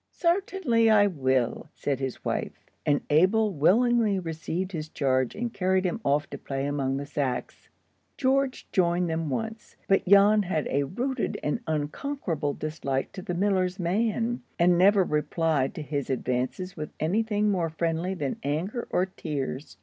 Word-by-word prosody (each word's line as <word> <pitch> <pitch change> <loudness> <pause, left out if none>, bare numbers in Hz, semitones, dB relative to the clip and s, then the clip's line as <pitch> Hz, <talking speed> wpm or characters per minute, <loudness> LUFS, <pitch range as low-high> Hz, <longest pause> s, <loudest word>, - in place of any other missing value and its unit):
"Sartinly 340 - +1
I 210 -2 +6
will," 130 - 0
said 140 -2 -2
his 135 -2 -5
wife; - - -3 0.2
and 145 -1 +3
Abel 195 +7 +4
willingly 215 - +3
received 170 +2 -3
his 155 -3 -5
charge 130 -4 0
and 235 +1 -3
carried 190 0 +1
him 225 +6 -1
off 145 +2 +1
to - - -6
play 135 0 -3
among 135 -2 -1
the 140 - -4
sacks. 140 -4 -3 0.5
George 270 0 +1
joined 175 -1 +2
them 160 -1 -2
once, 220 - -4
but 195 -1 +2
Jan 200 +2 +6
had 175 -6 -1
a 140 +1 +1
rooted 250 - -2
and 150 - 0
unconquerable 155 - -2
dislike 140 -3 -3
to 185 - -7
the 180 -1 -4
miller's 185 -1 +1
man, 225 +6 0 0.2
and 175 0 +4
never 195 +2 +5
replied 150 -3 0
to 155 - -5
his 145 -1 -3
advances 130 +8 -2
with 150 -2 -5
any 175 +9 +1
thing 210 -1 +1
more 175 -4 0
friendly 165 +3 -1
than 145 -6 -3
anger 175 - -2
or 180 - +2
tears. 145 - -5
175 Hz, 155 wpm, -27 LUFS, 145-205 Hz, 0.5 s, I